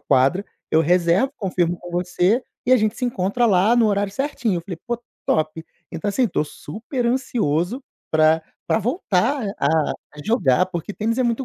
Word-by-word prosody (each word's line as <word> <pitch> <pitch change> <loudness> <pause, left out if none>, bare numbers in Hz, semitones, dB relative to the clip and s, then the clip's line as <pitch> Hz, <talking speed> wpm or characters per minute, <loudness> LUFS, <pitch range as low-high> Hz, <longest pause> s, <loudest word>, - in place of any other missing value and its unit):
quadra, 140 +7 +2 0.3
eu 160 - +4
reservo, 180 - +2
confirmo 175 -4 -1
com 175 - -10
você, 180 +6 +1 0.2
e 255 - +4
a - - +8
gente 215 -1 0
se 255 - -2
encontra 235 +1 +1
lá 205 +2 +4
no 230 -2 +4
horário 200 -1 0
certinho". 250 -7 -1
Eu 170 - -8
falei: 175 -2 -7
"Pô, 240 -1 -2 0.3
top". 155 +1 0 0.3
Então, 210 - -3
assim, 255 - 0
eu 215 - -1
tô - - 0
super 230 - -5
ansioso 235 - 0 0.3
pra 155 0 +4 0.2
pra - - +2
voltar 240 - 0
a - - +1 0.5
a 150 - -9
jogar, 185 - +3
porque 180 +2 -5
tênis 225 +2 -1
é - - +3
muito 240 +3 0
200 Hz, 185 wpm, -22 LUFS, 170-235 Hz, 0.5 s, a